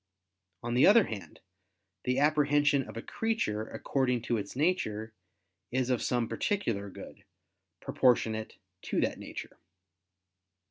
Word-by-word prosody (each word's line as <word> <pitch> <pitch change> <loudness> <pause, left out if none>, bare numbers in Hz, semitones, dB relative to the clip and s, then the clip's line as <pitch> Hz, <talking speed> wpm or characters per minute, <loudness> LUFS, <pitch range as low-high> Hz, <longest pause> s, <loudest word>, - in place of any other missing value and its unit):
On 120 0 -2
the 125 +3 +6
other 220 +2 +7
hand, 100 - -8 0.6
the 125 +1 +1
apprehension 145 -1 +3
of - - -8
a 115 - -5
creature, 110 - -1
according 125 -3 -1
to 120 -1 0
its 100 +1 -5
nature, 110 - 0 0.6
is 130 0 0
of 125 - +1
some 120 -2 0
particular 115 - -1
good, - - -11 0.6
proportionate 110 -3 +1 0.2
to - - -2
that - - -1
nature. - - -8
125 Hz, 125 wpm, -30 LUFS, 110-145 Hz, 0.6 s, other